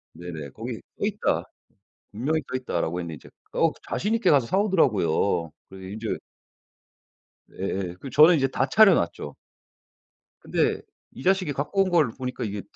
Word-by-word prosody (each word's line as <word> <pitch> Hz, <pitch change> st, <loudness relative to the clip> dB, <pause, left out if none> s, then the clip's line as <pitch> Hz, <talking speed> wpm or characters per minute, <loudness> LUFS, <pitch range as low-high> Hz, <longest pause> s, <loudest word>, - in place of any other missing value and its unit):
네네. 80 Hz, -4 st, -7 dB
"거기 -, -, -6 dB, 0.2 s
써 -, -, 0 dB
있다. -, -, 0 dB, 0.7 s
분명히 145 Hz, +9 st, -1 dB
써 -, -, -3 dB
있다."라고 90 Hz, -9 st, -2 dB
했는데. 85 Hz, -2 st, -5 dB
이제 -, -, -15 dB, 0.2 s
어 -, -, +3 dB, 0.2 s
자신 210 Hz, +4 st, -1 dB
있게 230 Hz, -, +2 dB
가서 135 Hz, -5 st, +4 dB
사 190 Hz, -, +1 dB
오더라고요. 100 Hz, -, +2 dB, 0.2 s
그래서 95 Hz, 0 st, -10 dB
인제 110 Hz, +3 st, -4 dB, 1.3 s
예예. 95 Hz, -2 st, -4 dB
그 135 Hz, -, -7 dB
저는 155 Hz, +7 st, +7 dB
이제 135 Hz, -3 st, +2 dB
다 130 Hz, 0 st, 0 dB
차려 200 Hz, +6 st, +6 dB
놨죠. 85 Hz, -, -2 dB, 1.1 s
근데 -, -, 0 dB, 0.3 s
이 -, -, -10 dB
자식이 185 Hz, -3 st, +2 dB
갖고 150 Hz, +8 st, 0 dB
온 185 Hz, -, -3 dB
걸 165 Hz, -7 st, +4 dB
보니까 125 Hz, -2 st, -4 dB
이게 105 Hz, -2 st, -4 dB
125 Hz, 305 characters per minute, -25 LUFS, -, 1.3 s, 저는